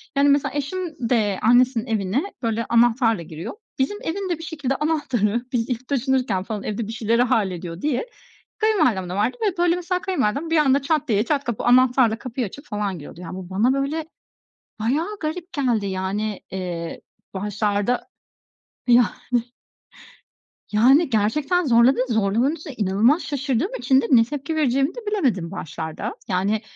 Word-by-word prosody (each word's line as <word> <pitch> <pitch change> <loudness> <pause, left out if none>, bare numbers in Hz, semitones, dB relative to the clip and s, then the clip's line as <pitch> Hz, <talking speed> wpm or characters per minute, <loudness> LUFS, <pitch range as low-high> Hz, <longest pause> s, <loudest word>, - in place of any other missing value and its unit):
yani, 280 +1 +4
mesela, 280 -1 +2
eşim 295 -4 -3
de 210 -6 +1
annesinin 245 +1 +4
evine 220 - 0 0.2
böyle 230 -1 -1
anahtarla 230 -3 +3
giriyor. 160 +1 -7 0.3
Bizim 270 +10 0
evin 390 -2 -3
de, 345 - 0
bir - - -8
şekilde, 295 -5 -2
anahtarı, 250 -7 0
biz 235 -2 -1
ilk 250 0 -3
taşınırken, 255 -7 0
falan, 210 0 -5
evde 215 0 -3
bir - - -5
şeyleri 230 +1 +1
hallediyor 185 -7 -1
diye 300 - -1 0.5
kayınvalidemde 305 - +1
vardı 210 +6 0
ve 365 - -5
böyle, 350 0 +3
mesela, 360 +1 -2
kayınvalidem 305 - -1
bir 325 - +3
anda 280 -2 +4
çat 300 +1 0
diye, 210 -3 +3
çat 285 +2 0
kapı 235 -4 -3
anahtarla 245 -2 +4
kapıyı 250 -1 -3
açıp 280 +9 -11
falan 210 -5 -2
giriyordu. 165 +1 -10
Yani, 180 0 -7
bu 185 -1 -8
bana 215 +7 +2
böyle 280 +4 -1 0.7
bayağı 315 - -1
garip 340 +3 -4
geldi, 245 -9 0
yani, 195 +2 -2
eee, 175 -3 -5 0.3
başlarda 205 +3 -1 0.8
Yani. 240 -1 +6 1.6
Yani 260 +9 +5
gerçekten 280 - +1
zorladı, 240 +1 +5
zorlamanın 225 +7 +1
üstüne 305 -3 -9
inanılmaz 220 - +2
şaşırdığım 285 - -1
için 265 -1 +3
de - - -3
ne 230 -3 +7
tepki 290 +5 -4
vereceğimi 275 - +1
de - - -5
bilemedim 240 - 0
başlarda. 165 - -5
Yani, 200 +2 0
245 Hz, 155 wpm, -22 LUFS, 210-290 Hz, 1.6 s, ne